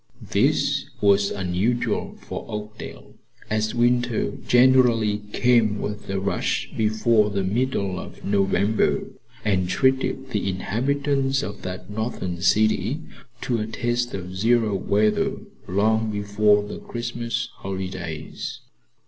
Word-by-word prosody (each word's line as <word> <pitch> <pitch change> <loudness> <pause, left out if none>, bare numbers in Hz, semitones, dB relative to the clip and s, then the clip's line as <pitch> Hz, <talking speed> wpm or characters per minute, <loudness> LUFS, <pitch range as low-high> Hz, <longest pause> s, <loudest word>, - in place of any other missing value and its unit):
This - - +2
was 100 -1 +4
unusual 100 +6 -1
for - - -6
Oakdale, 105 +1 -7 0.4
as 110 +1 0
winter 120 -1 +2 0.2
generally 120 -4 +4
came 115 -4 +3
with 105 -1 -5
a 95 0 -1
rush 100 +1 -1
before 110 0 +3
the 100 -1 -1
middle 100 -2 0
of - - -10
November, 100 +1 +2 0.4
and 95 -4 +1
treated 130 +1 +1
the 100 -3 0
inhabitants 135 +7 0
of 100 0 -6
that 90 +3 -6
northern 105 -5 -3
city 110 - +2 0.4
to 120 -2 0
a 105 - -2
taste 120 +1 -1
of 95 -1 -6
zero 110 +1 +2
weather 105 +2 +1 0.3
long 110 +4 +2
before 105 0 +2
the 105 - -7
Christmas 120 -1 -3
holidays. 95 -5 -5
105 Hz, 115 wpm, -24 LUFS, 100-120 Hz, 0.4 s, was